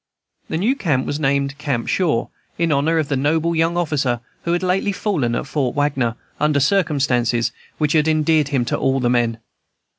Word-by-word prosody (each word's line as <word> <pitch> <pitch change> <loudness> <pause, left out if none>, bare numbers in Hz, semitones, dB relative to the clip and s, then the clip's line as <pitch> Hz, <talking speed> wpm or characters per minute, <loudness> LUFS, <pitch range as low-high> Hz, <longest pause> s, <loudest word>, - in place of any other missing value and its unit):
The 160 - -1
new 225 +10 +1
camp 145 - 0
was 145 - -3
named 140 0 0
Camp 140 -6 -2
Shaw, 160 -11 0 0.3
in 170 -1 +1
honor 150 +3 +2
of 155 -3 0
the 140 - -1
noble 160 +5 +1
young 165 +2 +1
officer 145 -8 0 0.3
who 170 - +1
had 175 - 0
lately 190 +2 +1
fallen 160 - -1
at - - -2
Fort 135 -3 -1
Wagner, 135 -5 0 0.2
under 150 -1 +2
circumstances 135 - +1 0.3
which 150 -2 +1
had 155 -1 +3
endeared 155 -1 +2
him 135 -4 0
to - - -1
all 135 0 +1
the 120 -1 +1
men. 120 -2 +1
145 Hz, 185 wpm, -20 LUFS, 130-165 Hz, 0.3 s, had